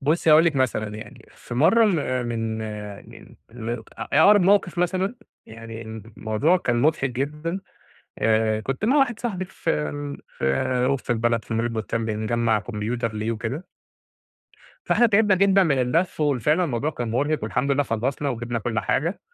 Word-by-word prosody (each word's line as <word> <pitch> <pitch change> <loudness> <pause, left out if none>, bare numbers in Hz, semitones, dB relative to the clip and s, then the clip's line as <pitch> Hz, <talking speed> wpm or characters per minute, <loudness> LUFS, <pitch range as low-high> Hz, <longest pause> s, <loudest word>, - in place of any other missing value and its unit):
بُصي، 155 +3 +2
هاقول 155 +2 +7
لِك 160 -4 +1
مثلًا 125 -5 0
يعني 110 -1 -11
في 120 - -10
مرة 220 - +5
ال 135 - 0
من 115 -1 -2 0.5
من - - -14 0.2
م 115 -2 -6
أ 120 -2 -4 0.3
أقرب 205 0 +6
موقف 185 -2 +3
مثلًا، 185 +5 0 0.3
يعني 115 0 -9
الموضوع 110 - -1
كان 120 -8 0
مضحك 150 -3 +2
جدًا، 150 +8 -3 0.6
آآ 110 0 +2
كنت 135 - -3
مع 255 +6 +3
واحد 255 -5 +2
صاحبي 195 -6 -3
في 185 - -4
ال 75 -1 -3 0.2
في 125 - +1
وسط 135 -2 -1
البلد 115 -1 +1
في 115 - -4
mall 110 - +1
البستان، 115 -1 -2
بنجمَّع 110 +1 0
كمبيوتر 115 +2 -3
ليه 110 +2 -2
وكده. 115 - -4 1.2
فاحنا 240 - +4
تعبنا 210 -2 +4
جدًا 195 +1 +4
من 150 -7 +2
اللف 160 +8 0
وال 145 -4 +1
فعلًا 155 +9 +2
الموضوع 140 0 -1
كان 120 -6 -4
مرهق 145 +6 0
والحمد 125 +6 -1
لله 140 +1 +2
خلصنا 130 +4 -2
وجِبنا 120 -2 -3
كل 110 0 -2
حاجة، 165 - -1
125 Hz, 165 wpm, -24 LUFS, 115-165 Hz, 1.2 s, هاقول